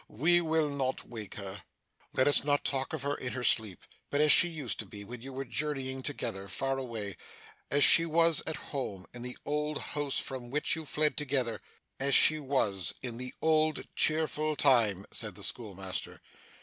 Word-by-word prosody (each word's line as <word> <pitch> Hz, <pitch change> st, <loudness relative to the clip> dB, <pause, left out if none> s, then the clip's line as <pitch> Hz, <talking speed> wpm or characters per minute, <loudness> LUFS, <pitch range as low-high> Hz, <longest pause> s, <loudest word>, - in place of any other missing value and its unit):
We 175 Hz, +9 st, +2 dB
will 160 Hz, -2 st, 0 dB
not 135 Hz, -2 st, -3 dB
wake 110 Hz, -5 st, -9 dB
her.' 100 Hz, 0 st, -7 dB, 0.5 s
'Let 130 Hz, -, +2 dB
us 145 Hz, -, +6 dB
not 145 Hz, 0 st, 0 dB
talk 135 Hz, -1 st, -1 dB
of 155 Hz, -4 st, -5 dB
her 140 Hz, 0 st, -1 dB
in 125 Hz, -3 st, -5 dB
her 125 Hz, -, -5 dB
sleep, 110 Hz, -7 st, +2 dB, 0.3 s
but 145 Hz, -, -1 dB
as 150 Hz, 0 st, +4 dB
she 175 Hz, -, +7 dB
used 155 Hz, -8 st, -4 dB
to 110 Hz, -, -5 dB
be 100 Hz, +1 st, -9 dB
when 120 Hz, +3 st, -9 dB
you 135 Hz, +2 st, -9 dB
were 135 Hz, +1 st, -6 dB
journeying 135 Hz, -1 st, -2 dB
together, 115 Hz, -8 st, -3 dB
far 135 Hz, +8 st, -3 dB
away 110 Hz, -7 st, -6 dB, 0.5 s
as 145 Hz, +1 st, +3 dB
she 165 Hz, 0 st, +9 dB
was 165 Hz, 0 st, +4 dB
at 160 Hz, -, -2 dB, 0.2 s
home, 100 Hz, -9 st, -5 dB
in 120 Hz, -, -8 dB
the 125 Hz, 0 st, -7 dB
old 150 Hz, 0 st, -2 dB, 0.2 s
house 145 Hz, -2 st, -2 dB
from 130 Hz, -3 st, -5 dB
which 150 Hz, +4 st, +1 dB
you 160 Hz, -2 st, -7 dB
fled 150 Hz, +1 st, +1 dB
together 130 Hz, -6 st, -1 dB, 0.4 s
as 140 Hz, 0 st, +3 dB
she 155 Hz, 0 st, +6 dB
was, 115 Hz, -, -1 dB
in 120 Hz, -2 st, -5 dB
the 125 Hz, +1 st, -7 dB
old 155 Hz, -1 st, +1 dB
cheerful 155 Hz, -1 st, +2 dB
time,' 115 Hz, -10 st, +3 dB
said -, -, -2 dB
the -, -, -9 dB
schoolmaster. 95 Hz, -5 st, -3 dB
135 Hz, 190 wpm, -30 LUFS, 115-150 Hz, 0.5 s, she